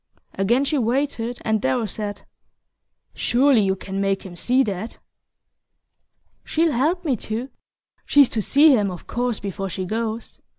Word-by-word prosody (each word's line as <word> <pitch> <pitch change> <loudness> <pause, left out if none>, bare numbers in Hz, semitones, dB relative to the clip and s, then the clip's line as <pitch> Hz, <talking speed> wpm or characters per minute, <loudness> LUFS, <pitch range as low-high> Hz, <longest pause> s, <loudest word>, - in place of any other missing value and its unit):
Again 235 +8 +1
she 295 0 0
waited, 245 -1 -1
and 220 -1 +1
Darrow 245 -3 0
said: 205 0 -5 0.9
"Surely 255 -1 +3
you 190 -1 +1
can 195 +1 -5
make 195 -1 0
him 180 -2 -9
see 250 +9 +2
that." 210 0 -5 1.5
"She'll 325 0 +1
help 330 +8 0
me 275 -5 +2
to 230 +6 -5 0.5
she's 285 -3 +5
to 220 - -1
see 285 +6 +5
him, 205 -4 +1
of 180 -2 -8
course, 245 -2 -2
before 195 -1 -4
she 185 +1 -4
goes. 225 +3 -4
230 Hz, 145 wpm, -22 LUFS, 200-265 Hz, 1.5 s, she's